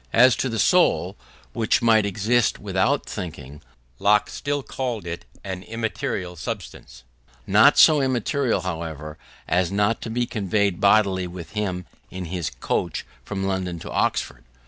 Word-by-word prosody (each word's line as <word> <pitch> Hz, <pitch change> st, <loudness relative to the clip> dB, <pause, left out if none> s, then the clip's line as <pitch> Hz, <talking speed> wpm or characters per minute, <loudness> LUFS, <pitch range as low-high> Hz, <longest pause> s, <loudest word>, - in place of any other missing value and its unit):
As 125 Hz, 0 st, +6 dB
to 130 Hz, -, -1 dB
the 115 Hz, -, -3 dB
soul, -, -, +3 dB, 0.4 s
which 115 Hz, +2 st, +1 dB
might 110 Hz, -3 st, +4 dB
exist 110 Hz, +4 st, +1 dB
without 100 Hz, +8 st, 0 dB
thinking, 75 Hz, -7 st, -7 dB, 0.4 s
Locke 105 Hz, +1 st, +3 dB
still 145 Hz, -1 st, -2 dB
called 125 Hz, -7 st, -4 dB
it 85 Hz, 0 st, -6 dB, 0.2 s
an 95 Hz, -2 st, -5 dB
immaterial 110 Hz, -5 st, -4 dB
substance: 85 Hz, -, -7 dB, 0.4 s
not -, -, +5 dB
so 155 Hz, -2 st, +7 dB
immaterial, 130 Hz, -3 st, 0 dB
however, 80 Hz, -3 st, -5 dB, 0.3 s
as 90 Hz, 0 st, +1 dB
not 105 Hz, +3 st, +1 dB
to -, -, -5 dB
be 120 Hz, +2 st, 0 dB
conveyed 100 Hz, -4 st, -1 dB
bodily 100 Hz, -3 st, +3 dB
with 85 Hz, -1 st, -9 dB
him 95 Hz, -4 st, -3 dB, 0.2 s
in 95 Hz, -1 st, -6 dB
his 85 Hz, -1 st, -3 dB
coach -, -, -3 dB, 0.2 s
from 95 Hz, -1 st, -4 dB
London 95 Hz, -2 st, -2 dB
to -, -, -8 dB
Oxford. -, -, -1 dB
100 Hz, 145 wpm, -23 LUFS, 90-115 Hz, 0.4 s, so